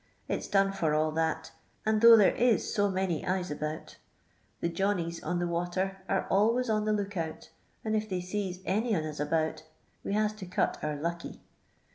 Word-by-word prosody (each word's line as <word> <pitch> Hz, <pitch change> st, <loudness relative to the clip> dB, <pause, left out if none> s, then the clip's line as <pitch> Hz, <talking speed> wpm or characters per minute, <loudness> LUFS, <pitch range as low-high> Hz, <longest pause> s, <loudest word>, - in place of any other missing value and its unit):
It -, -, -1 dB
's -, -, -6 dB
done 195 Hz, -1 st, +3 dB
for 160 Hz, -6 st, 0 dB
all 155 Hz, 0 st, +2 dB
that, 160 Hz, 0 st, -1 dB, 0.3 s
and 215 Hz, 0 st, +2 dB
though 230 Hz, 0 st, +10 dB
there 205 Hz, -, +5 dB
u 240 Hz, -2 st, +4 dB
so 205 Hz, -1 st, 0 dB
many 185 Hz, -4 st, -1 dB
eyes 185 Hz, -2 st, -1 dB
about 150 Hz, +1 st, -5 dB, 0.6 s
The -, -, 0 dB
"Johnnys" 170 Hz, -1 st, -1 dB
on 175 Hz, -, -1 dB
the 175 Hz, -, 0 dB
water 175 Hz, +3 st, -1 dB
are 195 Hz, -, +1 dB
always 230 Hz, +4 st, +3 dB
on 215 Hz, -1 st, +1 dB
the 215 Hz, -, +1 dB
look 205 Hz, -1 st, -2 dB
out, 160 Hz, -3 st, -5 dB, 0.3 s
and 220 Hz, 0 st, 0 dB
if 215 Hz, 0 st, -1 dB
they 185 Hz, -2 st, -1 dB
sees 185 Hz, 0 st, -4 dB
any 220 Hz, +3 st, +1 dB
on 160 Hz, -, 0 dB
us 155 Hz, -1 st, -6 dB
about, 155 Hz, +2 st, 0 dB, 0.4 s
we -, -, -2 dB
has 215 Hz, 0 st, +1 dB
to 190 Hz, -3 st, -8 dB
cut 180 Hz, -, 0 dB
our 150 Hz, -1 st, -2 dB
lucky. 170 Hz, +3 st, -5 dB
185 Hz, 195 wpm, -30 LUFS, 165-210 Hz, 0.6 s, though